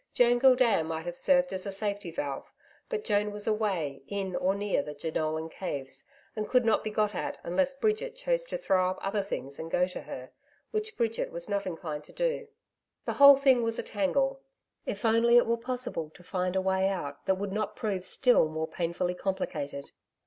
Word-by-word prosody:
Joan 245 Hz, 0 st, +5 dB
Gildea 250 Hz, -8 st, +5 dB
might 160 Hz, 0 st, -4 dB
have 175 Hz, 0 st, -4 dB
served 270 Hz, +4 st, +3 dB
as 190 Hz, +1 st, -1 dB
a -, -, -2 dB
safety 200 Hz, -1 st, -2 dB
valve, 145 Hz, -4 st, -4 dB, 0.4 s
but 450 Hz, -3 st, -2 dB
Joan 210 Hz, -1 st, +1 dB
was 205 Hz, 0 st, -2 dB
away 195 Hz, -11 st, -1 dB
in 195 Hz, -1 st, -3 dB
or 190 Hz, +2 st, +1 dB
near 205 Hz, 0 st, 0 dB
the 150 Hz, -, -7 dB
Jenolan 155 Hz, +1 st, -2 dB
Caves, 140 Hz, -6 st, -5 dB, 0.3 s
and 215 Hz, -1 st, -3 dB
could 250 Hz, -2 st, +4 dB
not 225 Hz, -, +3 dB
be 215 Hz, -, -2 dB
got 210 Hz, -1 st, +1 dB
at -, -, -3 dB
unless 270 Hz, +11 st, +1 dB
Bridget 440 Hz, -, 0 dB
chose -, -, 0 dB
to -, -, -4 dB
throw 185 Hz, -, +2 dB
up 185 Hz, -, -3 dB
other 200 Hz, +1 st, 0 dB
things 140 Hz, -8 st, -5 dB
and 160 Hz, -, -5 dB
go 180 Hz, +2 st, +2 dB
to 185 Hz, -, -7 dB
her, 130 Hz, 0 st, -8 dB, 0.4 s
which 430 Hz, 0 st, -3 dB
Bridget 230 Hz, -1 st, 0 dB
was 170 Hz, 0 st, -4 dB
not 200 Hz, -2 st, -1 dB
inclined 160 Hz, -4 st, -5 dB
to -, -, -16 dB
do. -, -, -1 dB, 0.6 s
The -, -, -1 dB
whole 280 Hz, 0 st, +9 dB
thing 265 Hz, -3 st, +4 dB
was 230 Hz, 0 st, 0 dB
a -, -, -2 dB
tangle. 270 Hz, +7 st, 0 dB, 0.5 s
If 205 Hz, +3 st, -3 dB
only 230 Hz, +2 st, +5 dB
it 240 Hz, -, +6 dB
were 230 Hz, -, +2 dB
possible 245 Hz, -9 st, -4 dB
to 180 Hz, -, -15 dB
find 180 Hz, +1 st, -2 dB
a 190 Hz, -, +2 dB
way 190 Hz, 0 st, +2 dB
out 145 Hz, -7 st, -5 dB
that 190 Hz, -, +4 dB
would 195 Hz, +1 st, -4 dB
not 215 Hz, +1 st, -2 dB
prove 195 Hz, -4 st, -2 dB
still 240 Hz, 0 st, +3 dB
more 160 Hz, +1 st, -3 dB
painfully 175 Hz, +1 st, -2 dB
complicated. 150 Hz, -7 st, -4 dB
200 Hz, 200 wpm, -29 LUFS, 175-240 Hz, 0.6 s, whole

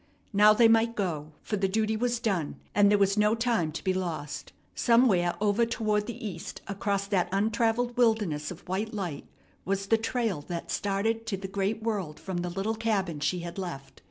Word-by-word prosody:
Now 210 Hz, +1 st, +7 dB
they 230 Hz, +2 st, +6 dB
might 225 Hz, +1 st, +3 dB
go, 155 Hz, -6 st, -3 dB
for 210 Hz, -, -2 dB
the 195 Hz, 0 st, +1 dB
duty 215 Hz, +2 st, 0 dB
was 240 Hz, +1 st, 0 dB
done, 195 Hz, -, -1 dB, 0.2 s
and 205 Hz, -1 st, +5 dB
there 205 Hz, -, +5 dB
was 200 Hz, +1 st, +2 dB
no 210 Hz, +1 st, +4 dB
time 230 Hz, -9 st, 0 dB
to -, -, -6 dB
be 190 Hz, -, +1 dB
lost. 170 Hz, -6 st, -4 dB, 0.2 s
Somewhere 225 Hz, -8 st, +3 dB
over 210 Hz, +2 st, +2 dB
toward 215 Hz, -2 st, 0 dB
the 230 Hz, -2 st, -5 dB
east 175 Hz, -4 st, -7 dB
across 200 Hz, 0 st, -1 dB
that 195 Hz, -3 st, 0 dB
untravelled 225 Hz, +4 st, +1 dB
wilderness 210 Hz, -11 st, +2 dB
of 180 Hz, -1 st, -10 dB
white 210 Hz, +4 st, -2 dB
light 175 Hz, -8 st, -4 dB, 0.4 s
was 195 Hz, +1 st, -1 dB
the 225 Hz, +3 st, +3 dB
trail 220 Hz, -7 st, -1 dB
that 170 Hz, -2 st, -4 dB
started 220 Hz, +3 st, -1 dB
to 200 Hz, -4 st, -1 dB
the 190 Hz, 0 st, -6 dB
great 200 Hz, +3 st, -2 dB
world 195 Hz, -9 st, -2 dB
from 190 Hz, -2 st, -4 dB
the 175 Hz, 0 st, -2 dB
little 195 Hz, +5 st, -2 dB
cabin 205 Hz, -8 st, -1 dB
she 165 Hz, +5 st, 0 dB
had 170 Hz, +2 st, -6 dB
left. 140 Hz, -8 st, -7 dB
200 Hz, 190 wpm, -28 LUFS, 180-225 Hz, 0.4 s, Now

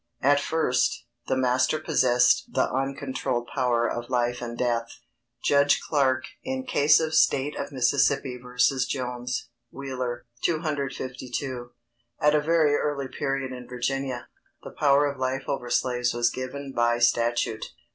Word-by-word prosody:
At 145 Hz, +2 st, +5 dB
first, 125 Hz, -6 st, 0 dB, 0.2 s
the 130 Hz, -, +1 dB
master 130 Hz, +3 st, +2 dB
possessed 130 Hz, -6 st, +3 dB
the -, -, +1 dB
uncontrolled 135 Hz, -2 st, -2 dB
power 120 Hz, -2 st, +1 dB
of 120 Hz, 0 st, -4 dB
life 120 Hz, -1 st, 0 dB
and 120 Hz, -1 st, -5 dB
death. 120 Hz, -1 st, 0 dB
[Sidenote: -, -, -19 dB, 0.2 s
Judge -, -, +5 dB
Clarke, 135 Hz, -4 st, +1 dB, 0.2 s
in 260 Hz, 0 st, -3 dB
case 150 Hz, -, +4 dB
of 160 Hz, -1 st, -2 dB
State 140 Hz, -1 st, +3 dB
of -, -, -5 dB
Miss. 125 Hz, -3 st, +2 dB, 0.2 s
v. 130 Hz, -3 st, -4 dB, 0.5 s
Jones. 125 Hz, -1 st, -3 dB, 0.2 s
Wheeler, 130 Hz, -3 st, -5 dB, 0.2 s
252.] 130 Hz, -5 st, -3 dB, 0.5 s
At 150 Hz, 0 st, +4 dB
a 150 Hz, -, +3 dB
very 155 Hz, -1 st, +3 dB
early 145 Hz, -2 st, -1 dB
period 135 Hz, -1 st, -2 dB
in 125 Hz, -1 st, -9 dB
Virginia, 125 Hz, 0 st, -3 dB, 0.4 s
the -, -, -8 dB
power 145 Hz, 0 st, +3 dB
of 140 Hz, -2 st, -3 dB
life 130 Hz, +1 st, -1 dB
over 125 Hz, -3 st, -3 dB
slaves 125 Hz, 0 st, 0 dB
was 120 Hz, 0 st, +2 dB
given 135 Hz, +2 st, -6 dB
by 120 Hz, 0 st, +2 dB
statute. 120 Hz, -2 st, +1 dB
130 Hz, 140 wpm, -26 LUFS, 120-140 Hz, 0.5 s, At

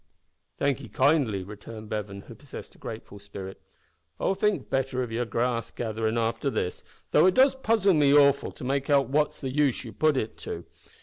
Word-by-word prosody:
"Thank 140 Hz, -2 st, 0 dB
'ee -, -, -10 dB
kindly," 130 Hz, -11 st, +2 dB
returned 105 Hz, +2 st, -10 dB
Bevan, 100 Hz, -2 st, -4 dB
who 115 Hz, -, -12 dB
possessed 140 Hz, +3 st, -10 dB
a -, -, -21 dB
grateful 110 Hz, -2 st, -8 dB
spirit; 100 Hz, -1 st, -9 dB, 0.6 s
"I'll -, -, +1 dB
think 210 Hz, +1 st, 0 dB
better 135 Hz, -1 st, -1 dB
of 120 Hz, -, -6 dB
yer 120 Hz, +2 st, -1 dB
grass 115 Hz, +1 st, -1 dB
gatherin' 110 Hz, 0 st, -2 dB
after 115 Hz, +3 st, 0 dB
this, 90 Hz, -8 st, -3 dB, 0.3 s
though -, -, +6 dB
it 185 Hz, -, +3 dB
does 265 Hz, +1 st, +6 dB
puzzle 225 Hz, -7 st, +2 dB
me 145 Hz, -3 st, +4 dB
awful 140 Hz, -1 st, +5 dB
to -, -, -11 dB
make 135 Hz, +2 st, -1 dB
out 140 Hz, -2 st, +4 dB
what's 150 Hz, +2 st, +1 dB
the 135 Hz, -2 st, -4 dB
use 140 Hz, -2 st, +1 dB
ye 115 Hz, -, -7 dB
put 155 Hz, +1 st, +2 dB
it 110 Hz, -, -3 dB
to. -, -, -6 dB
130 Hz, 190 wpm, -27 LUFS, 110-145 Hz, 0.6 s, though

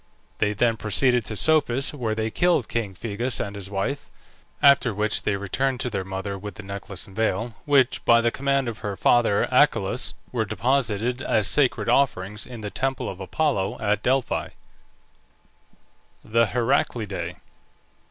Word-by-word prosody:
They 105 Hz, -1 st, +1 dB
then 115 Hz, +2 st, +1 dB
proceeded 120 Hz, +3 st, +2 dB
to 110 Hz, -, -4 dB
Psophis, 140 Hz, 0 st, +3 dB
where 115 Hz, -6 st, -2 dB
they 110 Hz, 0 st, -2 dB
killed 175 Hz, -7 st, +2 dB
king 105 Hz, -5 st, -3 dB
Phegeus 115 Hz, +5 st, -2 dB
and 100 Hz, 0 st, -4 dB
his 100 Hz, -1 st, -7 dB
wife, 100 Hz, +8 st, -3 dB, 0.5 s
after 135 Hz, -6 st, +5 dB
which 105 Hz, +1 st, 0 dB
they 100 Hz, -, 0 dB
returned 125 Hz, +7 st, -1 dB
to 125 Hz, -, -3 dB
their 100 Hz, -3 st, -2 dB
mother 95 Hz, +1 st, -5 dB
with 105 Hz, -1 st, -8 dB
the 105 Hz, -, -9 dB
necklace 100 Hz, -1 st, -6 dB
and 95 Hz, -, -15 dB
veil, 110 Hz, +1 st, -1 dB
which, 135 Hz, -3 st, +3 dB
by 120 Hz, 0 st, +5 dB
the 115 Hz, 0 st, +1 dB
command 140 Hz, 0 st, 0 dB
of 115 Hz, -2 st, -5 dB
her 100 Hz, -1 st, -4 dB
father 115 Hz, 0 st, +3 dB
Achelous, -, -, +2 dB, 0.2 s
were 120 Hz, -3 st, 0 dB
deposited 120 Hz, +2 st, 0 dB
as 110 Hz, -5 st, +1 dB
sacred 140 Hz, -4 st, +2 dB
offerings 105 Hz, -6 st, 0 dB
in 120 Hz, -3 st, -9 dB
the 105 Hz, -1 st, -5 dB
temple 135 Hz, 0 st, -2 dB
of 95 Hz, -, -6 dB
Apollo 100 Hz, -1 st, -1 dB
at 105 Hz, -1 st, 0 dB
Delphi. 130 Hz, +2 st, 0 dB, 1.8 s
THE 115 Hz, +1 st, +2 dB
HERACLIDAE. 120 Hz, -2 st, -1 dB
115 Hz, 155 wpm, -24 LUFS, 100-130 Hz, 1.8 s, after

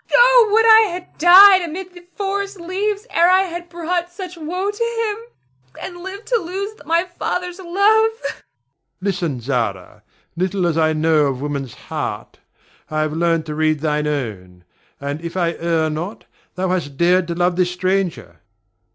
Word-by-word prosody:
Oh, -, -, +6 dB
would 450 Hz, +2 st, +4 dB
I 445 Hz, 0 st, +8 dB
had 355 Hz, +1 st, -8 dB
died 375 Hz, +3 st, +8 dB
amid 360 Hz, +2 st, -6 dB
the 355 Hz, -1 st, -14 dB
forest 400 Hz, 0 st, -3 dB
leaves 400 Hz, +5 st, -2 dB
ere 340 Hz, +1 st, +4 dB
I 370 Hz, +1 st, +5 dB
had 345 Hz, -1 st, -7 dB
brought 345 Hz, +1 st, -3 dB
such 365 Hz, 0 st, -8 dB
woe 360 Hz, +5 st, -3 dB
to -, -, -16 dB
him, 435 Hz, -, -6 dB
and 350 Hz, -2 st, -8 dB
lived 390 Hz, +3 st, -8 dB
to -, -, +3 dB
lose 395 Hz, +2 st, -5 dB
my 335 Hz, +1 st, +2 dB
father's 360 Hz, 0 st, -4 dB
love! 405 Hz, +5 st, +3 dB
[Weeps.] 450 Hz, +1 st, -6 dB
Ber. -, -, -16 dB, 0.6 s
Listen, 175 Hz, -9 st, -2 dB
Zara! 115 Hz, -7 st, -3 dB, 0.3 s
Little 185 Hz, +1 st, -1 dB
as 170 Hz, -2 st, 0 dB
I 160 Hz, -1 st, +2 dB
know 155 Hz, -1 st, +2 dB
of 135 Hz, -2 st, -3 dB
woman's 140 Hz, -3 st, -4 dB
heart, -, -, -6 dB, 0.5 s
I 155 Hz, 0 st, -1 dB
have 155 Hz, 0 st, -1 dB
learned 165 Hz, 0 st, 0 dB
to 155 Hz, -, -5 dB
read 155 Hz, -1 st, 0 dB
thine 150 Hz, -1 st, 0 dB
own; 100 Hz, -11 st, -5 dB, 0.4 s
and 140 Hz, +2 st, -4 dB
if 170 Hz, +1 st, -6 dB
I 170 Hz, -2 st, +1 dB
err 165 Hz, -1 st, +1 dB
not, 175 Hz, +8 st, -6 dB, 0.3 s
thou 185 Hz, 0 st, -1 dB
hast 155 Hz, -7 st, -2 dB
dared 175 Hz, +1 st, +3 dB
to 170 Hz, -, -3 dB
love 175 Hz, 0 st, +1 dB
this 180 Hz, -1 st, +1 dB
stranger. 180 Hz, -, -2 dB
195 Hz, 170 wpm, -19 LUFS, -, 0.6 s, I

